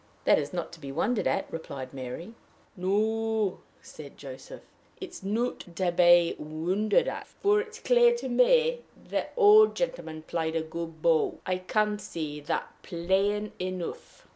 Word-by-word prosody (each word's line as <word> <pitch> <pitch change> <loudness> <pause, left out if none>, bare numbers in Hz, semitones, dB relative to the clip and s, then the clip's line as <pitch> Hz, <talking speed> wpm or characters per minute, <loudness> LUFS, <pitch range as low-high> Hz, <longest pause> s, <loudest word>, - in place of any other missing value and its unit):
"That - - +5
is 145 -1 -4
not 175 -2 -4
to 170 - -11
be 140 -3 -7
wondered 210 - 0
at," 195 - 0
replied 140 -5 -6
Mary. 135 - -7 0.4
"No," 215 +2 0 0.2
said 145 -3 -12
Joseph; 135 -1 -10 0.4
"it - - -7
is - - -11
not 225 +5 -1 0.2
to 185 -2 +1
be 175 -1 +5
wondered 180 - 0
at; - - -4
for 415 +1 +1
it's 440 0 -9
clear 480 -1 +4
to 475 - -5
me 480 - +3 0.2
the - - -3
old 430 -1 +7
gentleman 325 - -3
plied 160 0 -2
a 165 - 0
good 165 0 -7
bow. 165 -2 +3
I 185 0 0
can 210 +2 0
see 155 -6 -5
that 145 - -2
plain 195 +4 0
enough." 185 -1 -6
185 Hz, 155 wpm, -28 LUFS, 160-225 Hz, 0.4 s, old